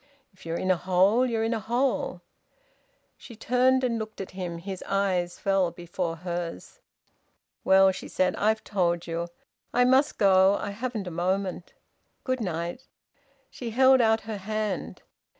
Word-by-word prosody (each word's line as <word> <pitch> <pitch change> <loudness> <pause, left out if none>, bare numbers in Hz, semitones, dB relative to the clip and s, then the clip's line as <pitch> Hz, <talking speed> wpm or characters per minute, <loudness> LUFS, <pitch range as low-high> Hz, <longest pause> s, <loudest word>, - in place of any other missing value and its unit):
"If 185 - -15
you're 165 +1 -2
in 185 - 0
a 185 - +2
hole, 190 +8 +3
you're 225 -2 -1
in 225 +1 0
a 225 - -1
hole." 240 +6 -1 1.0
She 235 - -12
turned 255 +3 +2
and 235 -2 0
looked 220 0 -7
at 195 - -6
him. 180 -2 -5
His 190 +2 -7
eyes 185 -3 0
fell 195 -2 +1
before 175 0 -4
hers. 170 - -6 0.8
"Well," 190 0 +6
she 185 - -8
said. 185 0 0
"I've 215 +1 +1
told 175 -4 0
you. 170 0 -3 0.4
I 245 +1 +3
must 260 +3 +3
go. 190 -1 +5
I 205 - -4
haven't 225 -1 -4
a 180 - -5
moment. 185 +1 -2 0.5
Good 255 -2 -1
night." 175 +4 -4 0.6
She 240 - -6
held 260 +2 +5
out 220 -1 +3
her 220 -1 -5
hand. 215 0 -4
195 Hz, 155 wpm, -26 LUFS, 180-225 Hz, 1.0 s, Well